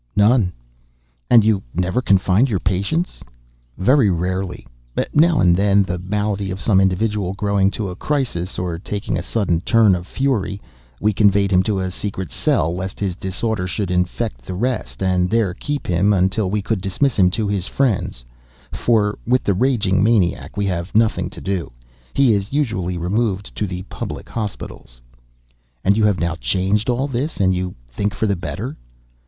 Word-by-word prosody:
"None." 105 Hz, -2 st, +4 dB, 0.8 s
"And 115 Hz, -3 st, +7 dB
you 110 Hz, -3 st, +3 dB
never 90 Hz, +8 st, 0 dB
confined 100 Hz, +3 st, +3 dB
your 105 Hz, -, +1 dB
patients?" 100 Hz, -, -1 dB, 0.5 s
"Very 120 Hz, +4 st, +4 dB
rarely. 90 Hz, -2 st, -2 dB, 0.5 s
Now 160 Hz, +1 st, +4 dB
and 85 Hz, -1 st, +5 dB
then, 100 Hz, +1 st, +3 dB
the 90 Hz, -1 st, -3 dB
malady 100 Hz, +1 st, -2 dB
of 95 Hz, +1 st, -4 dB
some 95 Hz, +1 st, +3 dB
individual 95 Hz, 0 st, 0 dB
growing 100 Hz, -1 st, +1 dB
to 100 Hz, 0 st, -4 dB
a 90 Hz, -, -6 dB
crisis, 120 Hz, -, -2 dB
or 85 Hz, -2 st, -3 dB
taking 100 Hz, +2 st, -3 dB
a -, -, -1 dB
sudden 90 Hz, -7 st, 0 dB
turn 110 Hz, 0 st, +4 dB
of 90 Hz, 0 st, -3 dB
fury, 125 Hz, -8 st, -1 dB, 0.4 s
we 105 Hz, 0 st, +2 dB
conveyed 100 Hz, -1 st, +3 dB
him 90 Hz, -1 st, +5 dB
to 100 Hz, +1 st, -1 dB
a 95 Hz, -1 st, -2 dB
secret 95 Hz, -1 st, -5 dB
cell, 85 Hz, +2 st, +1 dB
lest 95 Hz, +1 st, -5 dB
his 95 Hz, -4 st, -1 dB
disorder 95 Hz, +1 st, -2 dB
should 95 Hz, 0 st, -2 dB
infect 90 Hz, -8 st, -1 dB
the 90 Hz, +9 st, -6 dB
rest, 125 Hz, -1 st, -2 dB
and 90 Hz, -1 st, +2 dB
there 110 Hz, -5 st, +1 dB
kept 145 Hz, +9 st, -4 dB
him 95 Hz, +4 st, +2 dB
until 95 Hz, +1 st, +1 dB
we 105 Hz, +1 st, -1 dB
could 105 Hz, -1 st, -1 dB
dismiss 110 Hz, +7 st, 0 dB
him 90 Hz, -1 st, +6 dB
to 105 Hz, +3 st, -1 dB
his 100 Hz, -2 st, -2 dB
friends—for 95 Hz, -, -1 dB
with 125 Hz, 0 st, +2 dB
the 100 Hz, -, +2 dB
raging 100 Hz, -4 st, +2 dB
maniac 100 Hz, -5 st, +1 dB
we 100 Hz, -, 0 dB
have 90 Hz, -1 st, -3 dB
nothing 110 Hz, 0 st, +2 dB
to -, -, -11 dB
do. 95 Hz, -3 st, -3 dB, 0.4 s
He 135 Hz, -4 st, +4 dB
is 100 Hz, 0 st, -2 dB
usually 95 Hz, -11 st, -1 dB
removed 100 Hz, +2 st, -1 dB
to 105 Hz, -, -1 dB
the 90 Hz, 0 st, -5 dB
public -, -, -7 dB
hospitals." 100 Hz, -, -6 dB, 0.8 s
"And 100 Hz, -, +4 dB
you 110 Hz, 0 st, +3 dB
have 105 Hz, -3 st, +2 dB
now 85 Hz, -1 st, 0 dB
changed 100 Hz, +5 st, 0 dB
all 125 Hz, +3 st, +1 dB
this—and 120 Hz, -8 st, 0 dB
you 90 Hz, 0 st, -3 dB, 0.2 s
think 105 Hz, +10 st, -2 dB
for 110 Hz, -, 0 dB
the 100 Hz, -2 st, +1 dB
better?" 85 Hz, -, -5 dB
100 Hz, 170 wpm, -20 LUFS, 90-110 Hz, 0.8 s, And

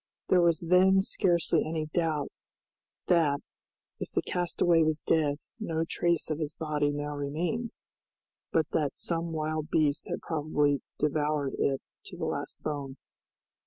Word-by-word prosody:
There 180 Hz, -, +5 dB
was 170 Hz, -2 st, +3 dB
then 190 Hz, +2 st, +5 dB
scarcely 175 Hz, -4 st, +2 dB
any 155 Hz, 0 st, -2 dB
doubt 155 Hz, -2 st, -1 dB, 0.7 s
that, 155 Hz, -5 st, +3 dB, 0.6 s
if -, -, -4 dB
the -, -, 0 dB
castaway 175 Hz, -1 st, +2 dB
was 155 Hz, -1 st, +2 dB
dead, 150 Hz, -3 st, +2 dB, 0.2 s
no 165 Hz, -6 st, -1 dB
trace 170 Hz, -2 st, 0 dB
of 155 Hz, -, -2 dB
his 150 Hz, -2 st, -3 dB
body 150 Hz, -2 st, 0 dB
now 145 Hz, 0 st, -3 dB
remained, 165 Hz, +11 st, -2 dB, 0.8 s
but 160 Hz, -2 st, +3 dB
that 150 Hz, -3 st, 0 dB
some 170 Hz, 0 st, -1 dB
wild 155 Hz, 0 st, -2 dB
beast 150 Hz, -2 st, +1 dB
had -, -, -3 dB
probably 150 Hz, -3 st, +1 dB, 0.2 s
devoured 150 Hz, -1 st, 0 dB
it 135 Hz, -1 st, +1 dB, 0.2 s
to -, -, -9 dB
the -, -, -2 dB
last -, -, -4 dB
bone. 140 Hz, -3 st, -4 dB
155 Hz, 140 wpm, -29 LUFS, 145-170 Hz, 0.8 s, There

